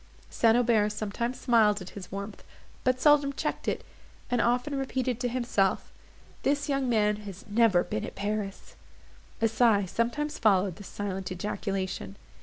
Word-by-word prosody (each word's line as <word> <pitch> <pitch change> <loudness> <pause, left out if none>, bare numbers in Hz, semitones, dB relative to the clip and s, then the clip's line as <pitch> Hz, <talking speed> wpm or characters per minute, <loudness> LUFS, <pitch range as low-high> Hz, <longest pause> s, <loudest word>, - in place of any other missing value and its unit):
St. 230 0 +4
Aubert 225 -4 +3
sometimes 215 +4 -3
smiled 220 -4 +4
at 185 -1 -9
his 190 -3 -9
warmth, 200 +1 -6 0.4
but 255 0 +2
seldom 285 -1 +4
checked - - -3
it, - - -1 0.5
and 245 -1 +2
often 245 +4 +1
repeated 260 -3 -1
to 250 - 0
himself, 235 -6 0 0.5
"This 285 +1 0
young 275 -3 0
man 210 -2 +2
has 200 -3 -9
never 205 -4 +4
been 110 - -3
at - - -6
Paris." 205 -1 -4 0.7
A 225 - +5
sigh 220 -3 +3
sometimes 240 +10 -2
followed 195 -4 +3
this 205 - -10
silent 195 -2 -4
ejaculation. 190 - -3
215 Hz, 150 wpm, -28 LUFS, 200-245 Hz, 0.7 s, A